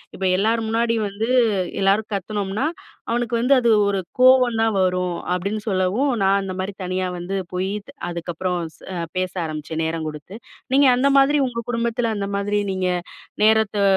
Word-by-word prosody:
இப்ப 195 - -7 0.2
எல்லார் 225 +3 +2
முன்னாடி 230 +1 +1
வந்து, 215 +4 -3 0.5
எல்லாரும் 205 +3 +2
கத்துனோம்னா 200 - -2 0.4
அவனுக்கு 235 0 0
வந்து 250 +4 +4
அது 235 -2 +2 0.2
ஒரு 200 -1 0 0.2
கோவம் 255 -2 +5
தான் 225 -1 +2
வரும். 180 -1 0 0.2
அப்படின்னு 200 +4 -2
சொல்லவும் 195 +9 +1
நான் 195 +1 +3
அந்த 195 -1 -4
மாரி 190 +2 -3
தனியாவந்து 185 0 -3 0.2
போயி, 185 +2 -1 0.4
அதுக்கப்புறம் 175 +1 -3 0.2
ச - - -25 0.2
அ - - -3 0.2
பேச 185 0 -1
ஆரம்பிச்சேன், 155 +1 -4
நேரம் 160 0 -2
கொடுத்து. 150 +5 -8 0.4
நீங்க 280 +1 +5
அந்த 255 +3 +2
மாதிரி 280 +2 +4
உங்க 235 -2 -4
குடும்பத்தில, 235 0 0
அந்த 200 -1 -2
மாதிரி 205 +1 0
நீங்க 185 -1 -1 0.6
நேரத்த 220 -1 +3
200 Hz, 155 wpm, -22 LUFS, 185-230 Hz, 0.6 s, கோவம்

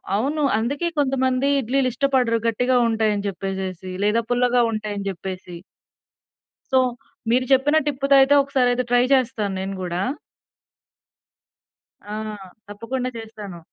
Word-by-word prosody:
అవును. 285 +8 0 0.2
అందుకే 280 +9 -1
కొంతమంది 260 -1 +1
ఇడ్లీలు 260 +1 +1
ఇష్టపడరు. 255 -3 +1
గట్టిగా 245 +3 +1
ఉంటాయని 215 -2 0
జెప్పేసేసి 190 -1 -4
లేదా 215 +3 +2
పుల్లగా 245 0 +3
ఉంటాయని 210 -2 -4
జెప్పేసి. 185 -1 -7 1.2
సో 260 - +5 0.5
మీరు 255 +1 +2
చెప్పిన 285 +3 +3
టిప్‌తో 275 0 +2
అయితే 280 +2 +5
ఒకసారి 260 -3 +1 0.2
ట్రై 245 0 +5
చేస్తాను 215 -6 -1
నేను 195 +1 -4
గూడా. 175 +1 -2 2.1
ఆ 210 - -6 0.5
తప్పకుండా 245 +5 -4
చేస్తాను. 210 -5 -9
235 Hz, 110 wpm, -22 LUFS, 205-260 Hz, 2.1 s, సో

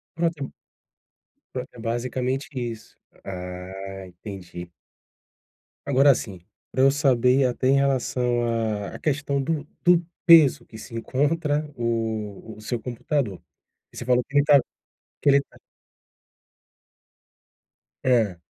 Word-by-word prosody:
Pra 170 0 +2
ter 145 -5 -7 1.0
Pra 125 0 -4
ter - - -16
basicamente 125 +3 -2
isso, 115 -2 -6 0.3
ah, 95 +1 -7
entendi. 90 -2 -9 1.1
Agora 140 0 +5
assim, 100 -7 -3 0.3
pra 130 - 0
eu 135 - +7
saber 135 -2 +3
até 125 +1 0
em 135 - +5
relação 125 -3 +1
à 110 -3 -2
à - - -8
questão 140 -2 0
do 150 +1 -2 0.2
do 175 -1 +5 0.2
peso 165 -6 +7
que 110 - -12
se 115 - -10
encontra 145 +5 0
o 110 -2 -3
o 110 - -13
seu 120 +2 -3
computador. 125 - -2 0.5
Você 120 - -7
falou 125 0 +3
que 140 - -2
ele 145 - +5
tá 145 -2 +7 0.6
que 145 - +3
ele 140 0 +6
tá - - -19 2.5
É. 115 -8 +2
125 Hz, 125 wpm, -24 LUFS, 110-140 Hz, 2.5 s, eu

